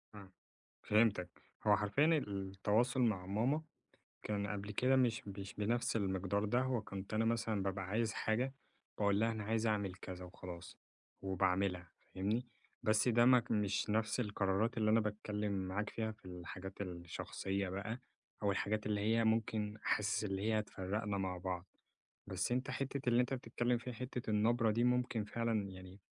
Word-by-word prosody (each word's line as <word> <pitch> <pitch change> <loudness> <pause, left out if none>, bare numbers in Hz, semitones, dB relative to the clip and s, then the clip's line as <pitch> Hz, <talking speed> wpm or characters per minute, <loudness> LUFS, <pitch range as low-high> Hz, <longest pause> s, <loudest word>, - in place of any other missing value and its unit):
امم، 100 -2 -11 0.5
فهمتك، 105 -4 +2 0.2
هو 105 -1 +7
حرفيًا 105 +8 +2
ال 155 -6 +3 0.2
التواصل 110 +6 +1
مع 105 -7 +2
ماما 120 +11 +1 0.6
كان 100 -1 -1
قبل 100 0 -4
كده 125 +5 +3
مش 120 -5 +2
مش 100 0 -6
بنفس 115 +4 0
المقدار 100 0 0
ده. 120 +4 +2
هو 130 -3 0
كنت 100 -1 -7
أنا 110 +1 +2
مثلًا 110 -3 +1
بابقى 95 0 -2
عايز 110 +3 0
حاجة 125 +5 0 0.4
باقول 100 -1 +3
لها: 115 +1 +3
"أنا 110 -2 -4
عايز 110 +2 +1
أعمل 100 -3 0
كذا" 90 -1 -7
وخلاص 90 -1 -9 0.4
وباعملها، 95 -2 0 0.2
فاهمني؟ 105 +6 0 0.4
بس 110 +1 +3
ده 120 0 +5
ماك 125 -2 +5
مش 105 -1 +1
نفس 110 +3 +1
القرارات 105 -1 +1
اللي 110 -1 +3
أنا 115 - +6
باتكلّم 105 -2 -2
معاك 105 +3 -2
فيها 110 -1 -2
في 105 - -17
الحاجات 90 +2 -7
الشخصيّة 95 +2 -3
بقى 100 +6 -3 0.4
أو 100 - +3
الحاجات 105 +2 -1
اللي 105 -1 0
هي 115 +2 +3
ممكن 110 -1 +1
أحس 105 0 +1
اللي 95 -2 -2
هي 110 +1 +2
تفرقنا 105 +1 -2
مع 95 -2 -2
بعض. 90 0 -3 0.6
بس 95 +4 -1
أنت 125 +2 0
حتّة 135 -1 -2
اللي 120 0 +5
أنت 125 +2 +1
بتتكلّم 120 -1 0
فيها، 125 +2 -6
حتّة 125 0 -4
النبرة 110 +2 +3
دي 115 +3 +2
ممكن 125 -3 +2
فعلًا 110 -2 -1
يعني، 95 +1 -11
105 Hz, 165 wpm, -37 LUFS, 95-115 Hz, 0.6 s, هو